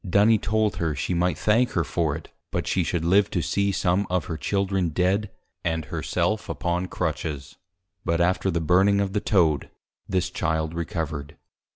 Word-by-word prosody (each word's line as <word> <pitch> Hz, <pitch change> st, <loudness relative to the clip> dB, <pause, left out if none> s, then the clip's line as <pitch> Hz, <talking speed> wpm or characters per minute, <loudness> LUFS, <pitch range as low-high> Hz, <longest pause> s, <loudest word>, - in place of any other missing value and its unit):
Duny 100 Hz, +3 st, +4 dB
told 110 Hz, 0 st, +1 dB
her, 80 Hz, -3 st, -1 dB
she 65 Hz, +7 st, -2 dB
might 90 Hz, +1 st, +1 dB
thank 115 Hz, +4 st, +2 dB
her 85 Hz, -, +2 dB
for 80 Hz, -2 st, -1 dB
it; 80 Hz, -, -9 dB, 0.2 s
but -, -, -2 dB
she -, -, +1 dB
should 85 Hz, -1 st, -1 dB
live 100 Hz, +3 st, +4 dB
to 85 Hz, -, -1 dB
see 100 Hz, 0 st, +1 dB
some 95 Hz, +1 st, +1 dB
of 90 Hz, -2 st, 0 dB
her 80 Hz, -, -4 dB
Children 95 Hz, +1 st, 0 dB
Dead, 95 Hz, +6 st, +1 dB, 0.3 s
and 80 Hz, -1 st, -1 dB
her -, -, -4 dB
self -, -, -1 dB
upon 90 Hz, +1 st, -1 dB
Crutches. 75 Hz, -4 st, -4 dB, 0.5 s
But 85 Hz, 0 st, 0 dB
after 90 Hz, +2 st, +2 dB
the 85 Hz, -2 st, 0 dB
Burning 95 Hz, +5 st, +4 dB
of 100 Hz, -1 st, -1 dB
the 105 Hz, -, 0 dB
Toad, 80 Hz, -8 st, +2 dB, 0.4 s
this 95 Hz, -2 st, 0 dB
Child 80 Hz, 0 st, -1 dB
Recovered. 80 Hz, -3 st, -4 dB
90 Hz, 180 wpm, -25 LUFS, 80-100 Hz, 0.5 s, Duny